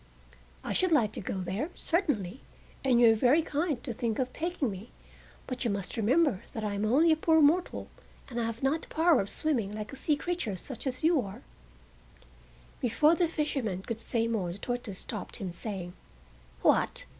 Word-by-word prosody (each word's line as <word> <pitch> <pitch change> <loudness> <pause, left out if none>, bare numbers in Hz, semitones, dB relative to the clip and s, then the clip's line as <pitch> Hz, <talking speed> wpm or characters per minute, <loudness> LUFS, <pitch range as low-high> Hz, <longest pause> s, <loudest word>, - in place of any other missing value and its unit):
"I - - -2
should 370 -1 +2
like 230 -10 +4
to - - -6
go 190 0 -3
there, 195 - -2
certainly, 270 - -1 0.4
and 255 -3 +4
you 235 -2 +8
are - - +3
very 260 +8 +4
kind 295 -4 -1
to 245 - -3
think 230 -1 -2
of 255 -1 -1
taking 330 - -1
me, 195 +5 -8 0.6
but 255 -1 -4
you 235 - +1
must 200 -2 -3
remember 245 - +2
that 220 - -4
I 210 -1 -1
am 200 +1 -1
only 295 +9 +4
a - - +5
poor 320 0 +3
mortal 315 +5 +2 0.4
and 240 -2 -4
have 230 +1 -3
not 295 +4 +2
the - - -10
power 325 -4 +4
of 195 - -5
swimming 245 -11 0
like 215 +3 -6
a - - -5
sea 295 +2 +1
creature 325 - -2
such 265 +8 -6
as 255 +2 -3
you 320 -3 +4
are—" 195 -4 -8 1.4
Before 295 +7 +4
the 345 0 +2
fisherman 270 - -2
could 230 0 -4
say 230 0 -1
more 205 -7 -1
the 175 - -7
tortoise 240 -3 -4
stopped - - -4
him, 190 -3 -4
saying: 180 -1 -6 0.7
"What? - - +2
245 Hz, 190 wpm, -30 LUFS, 210-305 Hz, 1.4 s, you